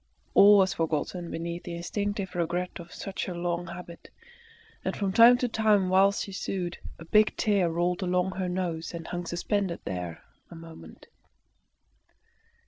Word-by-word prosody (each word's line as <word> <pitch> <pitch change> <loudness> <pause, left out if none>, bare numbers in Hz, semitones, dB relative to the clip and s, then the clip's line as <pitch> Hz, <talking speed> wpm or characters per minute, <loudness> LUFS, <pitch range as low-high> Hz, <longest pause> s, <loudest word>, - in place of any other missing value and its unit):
All 205 +1 +8
was 190 -2 +3
forgotten 165 +2 -2
beneath 170 +1 -4
the 170 - -6
instinctive 200 +2 -3
regret 175 +1 -2
of 170 0 -11
such 195 -1 -5
a 180 - -4
long 175 0 -2
habit, 170 0 -10 0.7
and - - -3
from 195 -2 -1
time 235 +3 +8
to 250 - 0
time 215 -4 +2
whilst 195 +2 +3
she 200 - -8
sewed, 185 -2 -4 0.2
a 165 - -11
big 215 +5 +3
tear 200 -5 +2
rolled 175 +3 -1
along 180 0 0
her 185 -1 -3
nose 175 -2 -3
and 165 -1 -7
hung 175 0 -5
suspended 180 +1 -2
there 90 -3 -5 0.3
a - - -11
moment. 165 0 -12
180 Hz, 155 wpm, -27 LUFS, 170-195 Hz, 0.7 s, All